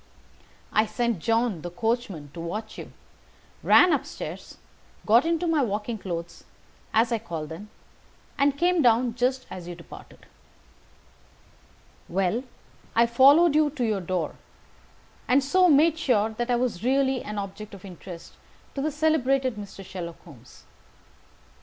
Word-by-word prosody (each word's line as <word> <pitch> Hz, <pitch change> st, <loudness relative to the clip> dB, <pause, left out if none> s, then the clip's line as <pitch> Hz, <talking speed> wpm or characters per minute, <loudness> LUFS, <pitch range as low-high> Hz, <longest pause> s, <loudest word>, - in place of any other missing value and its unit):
I 215 Hz, +1 st, +3 dB
sent 235 Hz, -5 st, -1 dB
John, 225 Hz, -2 st, 0 dB
the 175 Hz, -, -5 dB
coachman, 210 Hz, -, -3 dB
to -, -, -9 dB
watch 215 Hz, +6 st, -5 dB
you, -, -, -9 dB, 0.7 s
ran 360 Hz, -2 st, +6 dB
up 290 Hz, -, +1 dB
stairs, -, -, -8 dB, 0.5 s
got 235 Hz, +8 st, +5 dB
into 335 Hz, +1 st, 0 dB
my 325 Hz, -3 st, +2 dB
walking 215 Hz, -1 st, -2 dB
clothes, 170 Hz, -3 st, -6 dB, 0.5 s
as 230 Hz, +2 st, +2 dB
I 230 Hz, -, +1 dB
call 170 Hz, -8 st, -5 dB
them, 165 Hz, +7 st, -9 dB, 0.7 s
and 280 Hz, 0 st, +2 dB
came 355 Hz, +1 st, +2 dB
down 240 Hz, -1 st, +3 dB
just 255 Hz, +2 st, 0 dB
as 175 Hz, -2 st, -8 dB
you 175 Hz, -, -6 dB
departed. 170 Hz, -, -14 dB, 1.8 s
"Well, 195 Hz, +6 st, 0 dB, 0.5 s
I 235 Hz, -, +5 dB
followed 280 Hz, +8 st, +6 dB
you 305 Hz, 0 st, +3 dB
to 280 Hz, -3 st, -4 dB
your 210 Hz, -3 st, 0 dB
door, 175 Hz, -3 st, -2 dB, 0.9 s
and 265 Hz, +2 st, +4 dB
so 365 Hz, +6 st, +4 dB
made 315 Hz, +2 st, +4 dB
sure 225 Hz, -8 st, +2 dB
that 240 Hz, +3 st, -4 dB
I 245 Hz, -, +3 dB
was 240 Hz, -6 st, -2 dB
really 265 Hz, 0 st, +2 dB
an 210 Hz, 0 st, -6 dB
object 205 Hz, +1 st, -6 dB
of 195 Hz, -, -13 dB
interest 175 Hz, -2 st, -10 dB, 0.4 s
to 275 Hz, -, -3 dB
the 305 Hz, -, 0 dB
celebrated 275 Hz, -5 st, +1 dB
Mr. 200 Hz, -2 st, -9 dB
Sherlock 175 Hz, -3 st, -7 dB
Holmes. 135 Hz, -8 st, -16 dB
230 Hz, 145 wpm, -26 LUFS, 190-270 Hz, 1.8 s, ran